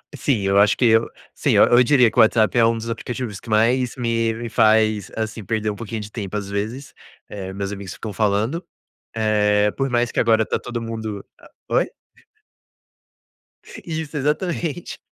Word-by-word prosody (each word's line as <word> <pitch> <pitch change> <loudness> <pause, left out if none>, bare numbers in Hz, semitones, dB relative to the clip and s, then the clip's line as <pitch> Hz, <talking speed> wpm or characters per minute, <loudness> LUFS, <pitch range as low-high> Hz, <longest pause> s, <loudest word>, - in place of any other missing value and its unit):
Sim, 130 -7 0
eu 95 0 +3
acho 105 +1 +4
que 125 - +2
eu, 115 0 +4 0.2
sim, - - 0
eu - - +6
eu 120 +1 +5
diria 125 -3 +4
que - - -13
o - - +8
WhatsApp 110 -2 +3
é 120 - +5
um 115 0 +2
dos 115 +1 -6
aplicativos 115 -2 -5
que - - -13
mais 120 +3 +2
me 115 -2 0
me 115 +1 -6
faz 110 -2 +3
assim 110 0 -4
perder 110 +1 -1
um - - -7
pouquinho 115 0 -6
de 105 0 -9
tempo, 105 -2 -5
às 100 -1 -5
vezes, 110 +7 -4 0.4
eh, 95 -2 -6
meus 100 0 -4
amigos 100 -3 -7
ficam 110 -2 -7
falando, 110 - 0 0.5
eh, 105 -1 +2
por 135 -1 -1
mais 120 -1 +1
que - - -5
agora 110 -1 +3
tá - - -1
todo 120 -1 -5
mundo 110 -3 -5 0.4
oi? - - +1 2.0
Isso 160 -2 -5
exatamente 165 +3 -2
110 Hz, 180 wpm, -21 LUFS, 105-120 Hz, 2.0 s, o